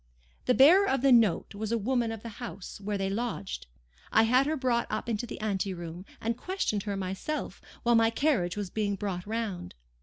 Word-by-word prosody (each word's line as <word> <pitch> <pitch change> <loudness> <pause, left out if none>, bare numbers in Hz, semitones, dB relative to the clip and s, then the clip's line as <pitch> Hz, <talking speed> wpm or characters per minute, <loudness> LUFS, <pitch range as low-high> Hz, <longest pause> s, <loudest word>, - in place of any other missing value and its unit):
The 250 - +4
bearer 355 +9 +7
of 265 -1 +1
the 275 - +5
note 225 -8 +4
was 210 +1 -4
the 230 - +1
woman 235 +1 0
of 225 -2 -7
the 230 -3 -9
house 205 -4 -7
where 205 0 -1
they 195 0 -1
lodged. 205 - -3 0.4
I 220 - +5
had 250 +5 +4
her 310 +1 0
brought 250 -3 +1
up - - -3
into 235 +1 -2
the - - -7
anteroom, 185 -4 -3
and 230 +1 -1
questioned 355 - -2
her 200 -2 -2
myself, 195 +11 -4 0.2
while 240 -1 +4
my 225 -1 +5
carriage 230 - +1
was 200 -3 -4
being 205 -2 0
brought 190 -2 -4
round. 215 - -3
225 Hz, 200 wpm, -29 LUFS, 200-245 Hz, 0.4 s, bearer